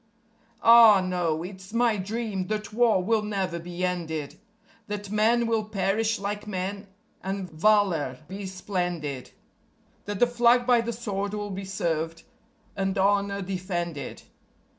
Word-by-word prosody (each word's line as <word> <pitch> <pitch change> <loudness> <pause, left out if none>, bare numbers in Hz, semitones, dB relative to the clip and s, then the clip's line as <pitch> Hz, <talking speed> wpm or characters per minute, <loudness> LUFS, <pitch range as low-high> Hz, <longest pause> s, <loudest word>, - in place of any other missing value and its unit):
Ah 230 -3 +9
no! 175 -3 -1
it's 190 +2 -10
my 235 -1 +3
dream 205 -1 -3
that 215 0 -3
War 225 -5 +3
will 220 +2 +2
never 195 -5 -2
be 175 +2 -3
ended; 160 -5 -3 0.5
That 205 -1 -5
men 225 +3 +3
will 225 -1 +1
perish 215 +2 0
like 205 +1 -4
men, 195 +1 -4 0.3
and 190 0 -3
valour 165 -6 +2
be 195 +1 -6
splendid; 175 -8 -3 0.8
That 205 -1 -3
the 245 - +5
Flag 240 0 +3
by 245 -1 +4
the 235 0 -3
sword 205 -3 -3
will 205 -1 -4
be 195 +1 -5
served, 165 -3 -2 0.5
and 195 0 -1
honour 200 0 +1
defended. 175 -6 -4
195 Hz, 135 wpm, -26 LUFS, 180-215 Hz, 0.8 s, Ah